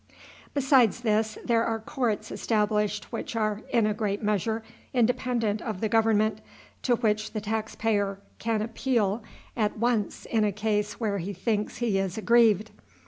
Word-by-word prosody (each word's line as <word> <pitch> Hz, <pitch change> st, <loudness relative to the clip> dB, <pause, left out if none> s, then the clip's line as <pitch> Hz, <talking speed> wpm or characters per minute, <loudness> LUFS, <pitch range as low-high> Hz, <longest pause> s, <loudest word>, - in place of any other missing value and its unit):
Besides 260 Hz, -5 st, +4 dB
this, 220 Hz, -1 st, +1 dB
there 230 Hz, -2 st, +3 dB
are 225 Hz, -1 st, 0 dB
courts 230 Hz, -2 st, -2 dB
established 210 Hz, -1 st, 0 dB
which -, -, -4 dB
are, 215 Hz, -1 st, 0 dB
in 230 Hz, -3 st, +3 dB
a 215 Hz, -, +1 dB
great 210 Hz, 0 st, -2 dB
measure, 215 Hz, +2 st, 0 dB, 0.3 s
independent 240 Hz, -3 st, +1 dB
of 215 Hz, -5 st, -4 dB
the 220 Hz, -, 0 dB
government, 220 Hz, -1 st, +2 dB, 0.4 s
to 245 Hz, -, +3 dB
which 215 Hz, -2 st, 0 dB
the 215 Hz, -, -1 dB
tax 220 Hz, +1 st, -3 dB
payer 205 Hz, -3 st, 0 dB, 0.2 s
can 225 Hz, -2 st, 0 dB
appeal 230 Hz, -2 st, 0 dB, 0.3 s
at 215 Hz, -3 st, 0 dB
once 230 Hz, -2 st, 0 dB
in 225 Hz, -2 st, +1 dB
a 210 Hz, -, +2 dB
case 210 Hz, 0 st, -1 dB
where 205 Hz, -4 st, 0 dB
he 190 Hz, +4 st, -4 dB
thinks 210 Hz, +3 st, -1 dB
he 220 Hz, -5 st, +1 dB
is 195 Hz, 0 st, -2 dB
aggrieved. 220 Hz, -2 st, +4 dB
220 Hz, 155 wpm, -27 LUFS, 210-230 Hz, 0.4 s, Besides